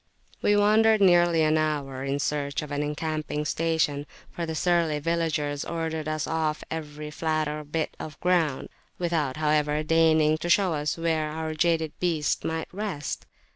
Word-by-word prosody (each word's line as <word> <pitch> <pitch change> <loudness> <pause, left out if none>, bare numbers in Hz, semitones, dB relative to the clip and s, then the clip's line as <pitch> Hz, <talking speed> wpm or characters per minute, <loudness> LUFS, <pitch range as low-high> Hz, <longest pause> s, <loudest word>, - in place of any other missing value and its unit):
We 205 - +3
wandered 215 +1 +5
nearly 175 -4 +5
an 155 0 +3
hour 140 -4 -2
in 140 +1 -1
search 145 0 -2
of 150 - -8
an 145 0 -1
encamping 150 0 -2
station, 155 -3 0 0.2
for 170 -1 -4
the 160 - -3
surly 170 -2 +2
villagers 150 -2 -1
ordered 160 -2 -3
us 155 0 -1
off 155 -1 -1
every 150 -1 -5
flatter 155 -1 -1
bit 155 +2 -3
of 155 - -8
ground, 170 -6 +1 0.3
without, 160 -6 -1
however, 150 0 +1
deigning 155 -1 +3
to 175 - -3
show 185 -1 +4
us 150 +1 -1
where 160 -2 0
our 160 +1 -4
jaded 160 -1 +1
beasts 165 -5 0
might 160 0 -3
rest. 190 -7 -4
155 Hz, 155 wpm, -26 LUFS, 150-165 Hz, 0.3 s, wandered